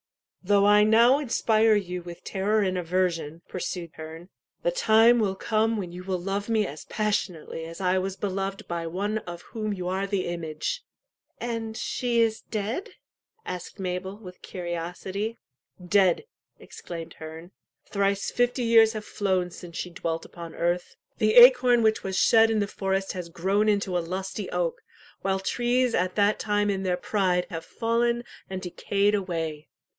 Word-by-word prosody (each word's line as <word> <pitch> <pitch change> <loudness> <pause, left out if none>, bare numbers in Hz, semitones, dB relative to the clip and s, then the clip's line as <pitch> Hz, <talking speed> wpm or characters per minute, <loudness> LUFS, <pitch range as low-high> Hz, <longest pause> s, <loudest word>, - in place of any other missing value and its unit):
"Though 200 +1 +4
I 210 0 +6
now 235 +5 +5
inspire 225 -5 +3
you 180 -3 -2
with 170 0 -10
terror 210 +3 +1
and 185 -1 0
aversion," 170 -2 -1
pursued 175 -2 -4
"the 165 - -6
time 235 - +5
will 200 -3 +1
come 220 +2 +1
when 185 -4 -4
you 180 +1 -8
will 185 -1 -2
love 195 +4 -3
me 220 -2 +2
as 150 -3 -8
passionately 185 -6 -2
as 165 +2 -9
I 185 0 +2
was 190 0 -3
beloved 195 0 -3
by 170 -1 -3
one 205 +6 -1
of 175 -4 -9
whom 215 -2 -2
you 180 -3 -4
are 190 +2 -1
the 195 -2 -1
image." 170 - -3 0.6
And 230 -2 -4
she 240 -2 -1
is 225 -1 +2
dead? 220 - -4 0.5
"asked 180 +2 -6
Mabel, 190 +1 -3
with 185 -4 -12
curiosity. 180 +5 -4 0.4
"Dead!" 185 - +3 0.3
exclaimed 165 -2 -8
Herne. 160 +3 -9 0.3
"Thrice 200 0 0
fifty 245 +1 +1
years 225 -1 +6
have 215 -1 -5
flown 185 -3 0
since 170 -1 -9
she 180 - -4
dwelt 165 -1 -3
upon 170 -2 -9
earth. 175 +1 -1 0.2
The 215 0 +3
acorn 245 -1 +8
which 220 0 +2
was 190 0 -2
shed 225 +1 +6
in 225 - +1
the 205 - 0
forest 195 -1 -1
has 180 -3 -6
grown 195 +5 +1
into 200 -3 +1
a - - +3
lusty 190 +3 -4
oak, 175 -2 -1 0.4
while 190 0 0
trees 245 +4 +1
at 180 +1 0
that 205 0 +3
time 205 -1 +1
in 195 -1 -2
their 180 -2 0
pride 180 -2 +1
have 165 -1 -4
fallen 235 +4 0 0.3
and 190 0 -5
decayed 200 +3 0
away. 165 -6 -2
195 Hz, 160 wpm, -26 LUFS, 180-220 Hz, 0.6 s, acorn